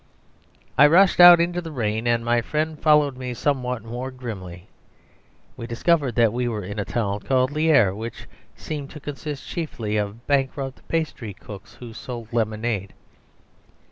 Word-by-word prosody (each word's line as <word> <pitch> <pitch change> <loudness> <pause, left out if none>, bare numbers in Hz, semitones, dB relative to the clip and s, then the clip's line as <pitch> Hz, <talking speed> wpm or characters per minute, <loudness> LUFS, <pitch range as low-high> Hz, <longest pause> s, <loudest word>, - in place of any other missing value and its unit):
I 145 - +9
rushed 180 +5 +5
out 175 -1 +10
into 175 +1 0
the 165 - -7
rain, 110 -3 -2
and 115 -1 +1
my 120 0 +2
friend 155 +5 -2
followed 150 -4 +3
me 125 -1 -5
somewhat 125 -3 -1
more 120 +3 -5
grimly. 100 -8 -8 0.9
We 115 - -7
discovered 135 +2 +1
we 120 +1 +2
were 110 -4 -3
in 100 +3 -6
a 100 - -2
town 105 -2 -2
called 130 +4 +1
Lierre, 150 -10 +3
which 110 +3 -7 0.3
seemed 145 -3 -6
to 150 - -10
consist 145 0 -7
chiefly 115 - -3
of 105 +3 -4
bankrupt 135 -1 -1
pastry 145 - -3
cooks, 100 0 -12
who 120 -2 -10
sold 120 -1 -8
lemonade. 110 -3 -2
125 Hz, 150 wpm, -23 LUFS, 110-145 Hz, 0.9 s, out